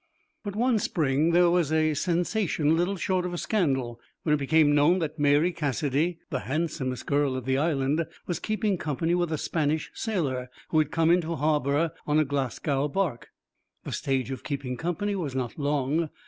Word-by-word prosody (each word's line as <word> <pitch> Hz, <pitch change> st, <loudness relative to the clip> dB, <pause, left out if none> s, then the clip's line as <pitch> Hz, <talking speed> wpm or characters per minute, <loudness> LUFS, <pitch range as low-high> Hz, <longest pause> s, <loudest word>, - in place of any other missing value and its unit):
But 205 Hz, -2 st, -5 dB
one 240 Hz, 0 st, +2 dB
spring 150 Hz, -4 st, +1 dB
there 175 Hz, 0 st, +4 dB
was 170 Hz, -4 st, +2 dB
a 155 Hz, -1 st, +2 dB
sensation 170 Hz, -1 st, +1 dB
little 175 Hz, +4 st, 0 dB
short 185 Hz, 0 st, 0 dB
of 180 Hz, -1 st, -3 dB
a -, -, -3 dB
scandal 135 Hz, -, 0 dB, 0.2 s
when 150 Hz, -, +2 dB
it 150 Hz, -, +2 dB
became 145 Hz, +1 st, +4 dB
known 150 Hz, +5 st, +4 dB
that 160 Hz, -3 st, -3 dB
Mary 145 Hz, +4 st, +4 dB
Cassidy, 150 Hz, +1 st, -1 dB
the 130 Hz, -, -1 dB
handsomest 135 Hz, -3 st, -3 dB
girl 140 Hz, -2 st, +1 dB
of 130 Hz, -2 st, -5 dB
the 130 Hz, +1 st, +1 dB
Island, 150 Hz, 0 st, +1 dB, 0.2 s
was 175 Hz, -, -2 dB
keeping 215 Hz, -3 st, -1 dB
company 160 Hz, +3 st, -1 dB
with 175 Hz, -2 st, 0 dB
a 155 Hz, -, 0 dB
Spanish 155 Hz, 0 st, -1 dB
sailor 140 Hz, -, -2 dB, 0.2 s
who 155 Hz, -, +3 dB
had 155 Hz, -2 st, +2 dB
come 165 Hz, +1 st, +2 dB
into 170 Hz, -1 st, +1 dB
harbour 150 Hz, +1 st, +1 dB, 0.2 s
on 150 Hz, 0 st, +2 dB
a 155 Hz, -, +4 dB
Glasgow 140 Hz, +1 st, -1 dB
barque. 150 Hz, -5 st, -2 dB, 0.5 s
The -, -, -6 dB
stage 135 Hz, -3 st, -1 dB
of 130 Hz, -, -6 dB
keeping 140 Hz, -3 st, -3 dB
company 175 Hz, +8 st, -2 dB
was 155 Hz, -9 st, -3 dB
not 130 Hz, +1 st, -3 dB
long. 145 Hz, +2 st, 0 dB
155 Hz, 180 wpm, -27 LUFS, 140-175 Hz, 0.5 s, there